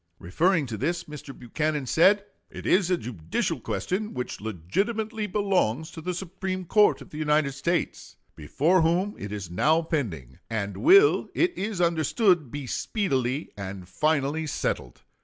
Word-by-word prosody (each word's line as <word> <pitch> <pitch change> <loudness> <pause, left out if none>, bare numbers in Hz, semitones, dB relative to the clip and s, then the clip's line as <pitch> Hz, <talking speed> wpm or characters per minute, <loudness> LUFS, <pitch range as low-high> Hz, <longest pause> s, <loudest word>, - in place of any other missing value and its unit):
Referring 160 - +1
to 115 -4 -5
this 170 - -1
Mr. 150 -2 -9
Buchanan 150 +4 -2
said: 195 +9 +4 0.2
"It - - -9
is 185 -2 +3
a 180 - +2
judicial 100 - -3
question, 210 +4 -3
which 125 - -4
legitimately 210 - -2
belongs 180 - 0
to 160 - -9
the 180 +2 -3
Supreme 185 +1 -4
Court 210 +4 +4
of - - -19
the 150 - -7
United 150 -2 +2
States, 165 +5 -2 0.2
before 155 - +2
whom 175 +5 +1
it 100 - -6
is 100 -5 -6
now 155 - +3
pending, 90 - -3
and 100 -3 -3
will, 395 +7 +5
it 350 +1 +2
is 200 -1 -3
understood, 170 - +2
be 145 +2 -6
speedily 135 - -1
and 95 -2 -7
finally 155 +4 0
settled. 60 - -3
155 Hz, 150 wpm, -26 LUFS, 120-185 Hz, 0.2 s, will